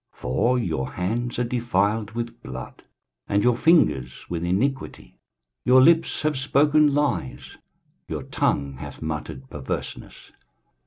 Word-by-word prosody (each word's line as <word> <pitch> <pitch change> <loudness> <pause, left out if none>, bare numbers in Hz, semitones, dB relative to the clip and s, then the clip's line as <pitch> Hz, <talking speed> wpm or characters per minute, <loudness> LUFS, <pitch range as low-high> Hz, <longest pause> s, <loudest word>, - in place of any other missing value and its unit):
23:059:003 - - -26
For 115 - +1
your 80 - -2
hands 115 +7 -2
are 125 - +1
defiled 110 -3 0
with 115 0 -5
blood, 65 0 -8 0.5
and 100 0 +2
your 125 -1 +4
fingers 70 - +2
with 85 -1 -2
iniquity; 120 +10 -2 0.5
your 130 +1 +6
lips 165 +5 +4
have 150 -3 0
spoken 145 +2 +4
lies, 105 - -2 0.5
your - - -4
tongue 70 -2 -1
hath - - -8
muttered 75 -3 -5
perverseness. 70 -3 -6
115 Hz, 125 wpm, -24 LUFS, 80-130 Hz, 0.5 s, your